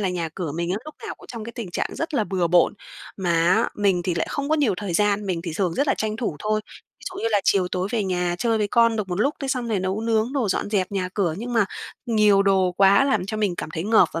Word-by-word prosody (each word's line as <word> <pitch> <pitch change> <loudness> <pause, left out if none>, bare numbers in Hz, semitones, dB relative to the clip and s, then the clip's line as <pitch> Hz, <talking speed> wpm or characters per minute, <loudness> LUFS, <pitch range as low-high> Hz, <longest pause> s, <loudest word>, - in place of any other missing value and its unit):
là 195 - 0
nhà 175 -2 -2
cửa 170 -6 -4
mình 170 +2 -2
á, 185 - 0
lúc 305 - -9
nào - - -5
cũng - - -16
trong 230 -3 -7
cái 235 - -7
tình 230 -7 -6
trạng - - -2
rất 325 -1 -3
là 220 - +2
bừa 185 -3 0
bộn. 175 +3 +4 0.4
Mà 185 -3 -1 0.2
á, - - +2
mình 195 -4 +1
thì 175 0 -1
lại 165 - -1
không 280 0 -3
có 310 - +3
nhiều 270 -10 +2
thời 200 -2 -4
gian, 205 +2 +2
mình 180 -3 -1
thì 170 -2 -4
thường 180 -4 0
rất 280 - +1
là - - +3
tranh 215 0 -2
thủ 225 -10 -3
thôi. 215 0 0 0.4
Ví - - -15
dụ 370 - -7
như 230 - +1
là 205 -2 +3
chiều 185 -2 +3
tối 185 +1 -2
về 220 -4 0
nhà 180 -2 0
chơi 225 +1 +1
với 210 -1 0
con 230 0 +3
được 210 -3 -3
một 180 +2 -2
lúc, 280 +7 +2
thế 275 - -3
xong 250 -3 -1
rồi 210 -4 0
nấu 190 +3 -2
nướng 225 +1 0
đồ, 265 -7 0
dọn 195 - -1
dẹp 195 -2 0
nhà 185 -2 -1
cửa. 180 -6 0
Nhưng 240 +3 -5
mà 225 -3 +4 0.4
nhiều 210 -4 +4
đồ 190 -2 +2
quá 195 +6 +5
làm 265 -9 +1
cho 215 - -3
mình 205 -4 0
cảm - - -5
thấy 160 0 -4
ngợp 220 +2 +5
và 165 - -3
205 Hz, 295 wpm, -23 LUFS, 180-225 Hz, 0.4 s, quá